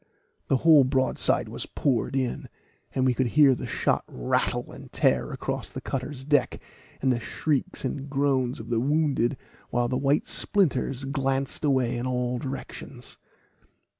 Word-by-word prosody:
The 135 Hz, -, +3 dB
whole 155 Hz, -1 st, +6 dB
broadside 130 Hz, 0 st, +2 dB
was -, -, -5 dB
poured 130 Hz, -2 st, 0 dB
in, 130 Hz, -3 st, -2 dB, 0.5 s
and 130 Hz, -, +2 dB
we 130 Hz, -, +3 dB
could 130 Hz, +1 st, 0 dB
hear 140 Hz, +2 st, +5 dB
the -, -, -5 dB
shot -, -, 0 dB
rattle -, -, -1 dB
and -, -, -12 dB
tear -, -, +1 dB
along -, -, -3 dB
the -, -, -3 dB
cutter's 135 Hz, 0 st, -4 dB
deck, 145 Hz, -3 st, +1 dB, 0.4 s
and 130 Hz, -1 st, +4 dB
the 120 Hz, -, -2 dB
shrieks 140 Hz, +3 st, -2 dB
and 135 Hz, +2 st, -4 dB
groans 135 Hz, -3 st, 0 dB
of 115 Hz, +1 st, -8 dB
the 115 Hz, -, +2 dB
wounded, 140 Hz, -2 st, +1 dB, 0.3 s
while 120 Hz, 0 st, +1 dB
the 130 Hz, 0 st, 0 dB
white 140 Hz, +2 st, +2 dB
splinters 140 Hz, -8 st, +1 dB
glanced 135 Hz, 0 st, -1 dB
away 130 Hz, -5 st, +2 dB
in 120 Hz, +2 st, -2 dB
all 125 Hz, -1 st, -1 dB
directions. 130 Hz, -1 st, -7 dB
130 Hz, 155 wpm, -26 LUFS, 125-140 Hz, 0.5 s, whole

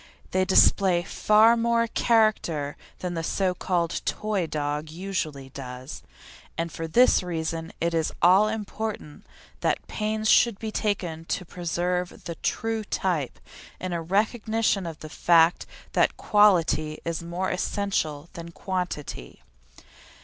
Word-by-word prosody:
They 185 Hz, 0 st, +2 dB
display 185 Hz, -1 st, +4 dB
far 215 Hz, +5 st, +4 dB
more 235 Hz, 0 st, +2 dB
character 215 Hz, -11 st, +1 dB, 0.3 s
than 180 Hz, -1 st, -3 dB
the 165 Hz, -, -2 dB
so 185 Hz, +2 st, 0 dB
called 175 Hz, -2 st, -1 dB
"toy 210 Hz, -5 st, -1 dB
dog" 150 Hz, 0 st, -3 dB
usually 160 Hz, -6 st, -4 dB
does, 130 Hz, 0 st, -8 dB, 0.6 s
and 165 Hz, 0 st, -2 dB
for 165 Hz, +2 st, -5 dB
this 245 Hz, +10 st, +5 dB
reason 165 Hz, -2 st, -4 dB
it 170 Hz, 0 st, 0 dB
is 160 Hz, -1 st, 0 dB
all 190 Hz, +4 st, +6 dB
important 215 Hz, -6 st, -5 dB, 0.3 s
that -, -, 0 dB
pains 215 Hz, 0 st, -2 dB
should 230 Hz, -1 st, +5 dB
be 220 Hz, 0 st, -5 dB
taken 180 Hz, -7 st, -2 dB
to 180 Hz, -, -3 dB
preserve 175 Hz, +1 st, -3 dB
the 170 Hz, -, -5 dB
true 225 Hz, +6 st, -2 dB
type, 175 Hz, -9 st, -2 dB, 0.4 s
in 185 Hz, -1 st, -4 dB
a 170 Hz, -, -2 dB
recognition 210 Hz, +1 st, 0 dB
of 165 Hz, -2 st, -6 dB
the 155 Hz, -, -7 dB
fact 165 Hz, +2 st, +3 dB, 0.3 s
that -, -, +2 dB
quality 175 Hz, -7 st, +3 dB
is 170 Hz, 0 st, -2 dB
more 175 Hz, +3 st, -3 dB
essential 180 Hz, -6 st, -2 dB
than 170 Hz, 0 st, -8 dB
quantity. 175 Hz, -, -5 dB
180 Hz, 130 wpm, -26 LUFS, 165-210 Hz, 0.6 s, all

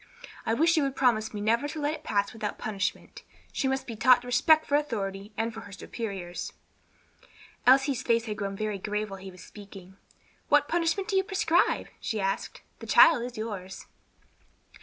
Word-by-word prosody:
I 225 Hz, -, +2 dB
wish 330 Hz, +5 st, +3 dB
you -, -, +4 dB
would 275 Hz, -1 st, -1 dB
promise 220 Hz, -4 st, +2 dB
me 210 Hz, -, -5 dB
never 230 Hz, +6 st, +1 dB
to 310 Hz, +1 st, -6 dB
let 295 Hz, +1 st, 0 dB
it -, -, -8 dB
pass 200 Hz, 0 st, 0 dB
without 215 Hz, -2 st, -4 dB
punishment. 200 Hz, -3 st, -4 dB, 0.3 s
She 270 Hz, -, 0 dB
must 265 Hz, 0 st, -1 dB
be 230 Hz, -, -6 dB
taught 245 Hz, +2 st, +5 dB
respect 310 Hz, +6 st, +4 dB
for -, -, -6 dB
authority 205 Hz, -8 st, -2 dB
and 225 Hz, +1 st, -1 dB
for 225 Hz, -, -8 dB
her 200 Hz, -, -12 dB
superiors." 195 Hz, -3 st, -6 dB, 1.1 s
Elsie's 270 Hz, 0 st, +5 dB
face 230 Hz, -1 st, +1 dB
had 215 Hz, -2 st, -4 dB
grown 200 Hz, -2 st, -3 dB
very 210 Hz, -1 st, -3 dB
grave 210 Hz, +1 st, -3 dB
while 195 Hz, -, -7 dB
he 190 Hz, +1 st, -9 dB
was 180 Hz, -2 st, -13 dB
speaking. 195 Hz, -2 st, -13 dB, 0.5 s
"What -, -, +4 dB
punishment 345 Hz, +3 st, 0 dB
do 405 Hz, -, -1 dB
you 385 Hz, -, +4 dB
prescribe?" 375 Hz, -4 st, +1 dB
she 220 Hz, -, -3 dB
asked. 195 Hz, 0 st, -3 dB, 0.2 s
"The -, -, -9 dB
child 320 Hz, -8 st, +7 dB
is 245 Hz, -1 st, -7 dB
yours." 200 Hz, -4 st, -6 dB
225 Hz, 180 wpm, -28 LUFS, 200-275 Hz, 1.1 s, child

